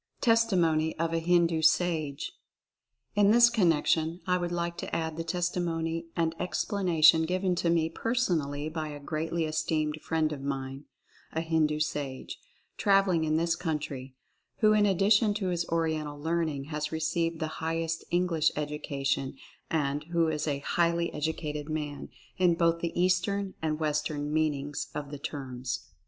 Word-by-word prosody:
TESTIMONY 180 - +3
OF 165 0 -1
A 165 - +2
HINDU 170 -1 +2
SAGE. 160 - +1 0.8
In 205 -1 +4
this 235 +2 +7
connection 165 -4 +2
I 180 - +2
would 175 -1 -2
like 170 0 -2
to - - -4
add 160 -1 -2
the 165 - -3
testimony 165 -1 -2
and 165 -1 +1
explanation 170 -5 +3
given 185 +1 +1
to 170 - +1
me 165 -1 +3
personally 165 - -1
by 155 0 -3
a 145 -1 -7
greatly 160 +3 -2
esteemed 155 0 -1
friend 155 -1 0
of 140 - -7
mine 135 0 -4 0.2
— - - -29
a 160 - 0
Hindu 160 -2 +1
sage 145 -3 -3 0.2
— - - -41
traveling 195 -5 +3
in 155 0 +1
this 165 +1 +1
country, 145 -6 -4 0.5
who 215 -1 +6
in 210 -1 +4
addition 205 +2 +3
to 195 -3 -1
his 170 -1 -1
Oriental 155 -3 -1
learning 160 -2 -1
has 150 0 -2
received 165 +1 -1
the 155 0 -4
highest 165 0 -1
English 170 -3 +2
education 140 -3 -2 0.3
and 145 -2 0
who 170 -1 +1
is 155 0 -2
"a 140 -1 -2
highly 170 0 +1
educated 150 -1 -3
man" 150 -2 -4 0.3
in 180 -2 +4
both 170 0 +2
the 170 0 -2
Eastern 185 +2 +1
and 155 -1 -1
West 150 -1 0
ern 145 -1 -3
meanings 145 -2 -1
of 145 -1 -5
the 145 - -6
terms. 125 -3 -5
160 Hz, 155 wpm, -29 LUFS, 150-175 Hz, 0.8 s, this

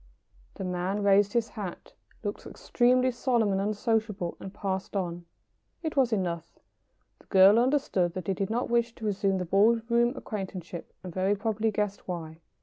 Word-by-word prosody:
The - - -5
man 185 +3 -2
raised 200 0 +4
his 230 -2 +1
hat, 205 -5 -7 0.3
looked - - -4
extremely 255 +1 +2
solemn 240 -4 +1
and 195 0 +1
unsociable, 210 -3 -1
and 195 - -7
passed 190 0 -4
on. 175 -2 -3 0.6
It 315 -1 -3
was 260 -4 +3
enough. 175 -5 -2 0.6
The - - -23
girl 195 +3 +7
understood 240 -10 +1
that 185 -2 -4
he 195 - 0
did 195 +1 -2
not 235 +3 -1
wish 235 0 +1
to 220 - -7
resume 195 -2 +1
the 180 - -2
ball 205 +6 +4
room 240 +1 +3
acquaintanceship, 185 -5 -6
and 180 -2 -7
very 190 +3 +1
probably 220 +1 0
guessed 210 -1 -2
why. 165 -3 -5
200 Hz, 165 wpm, -28 LUFS, 185-230 Hz, 0.6 s, girl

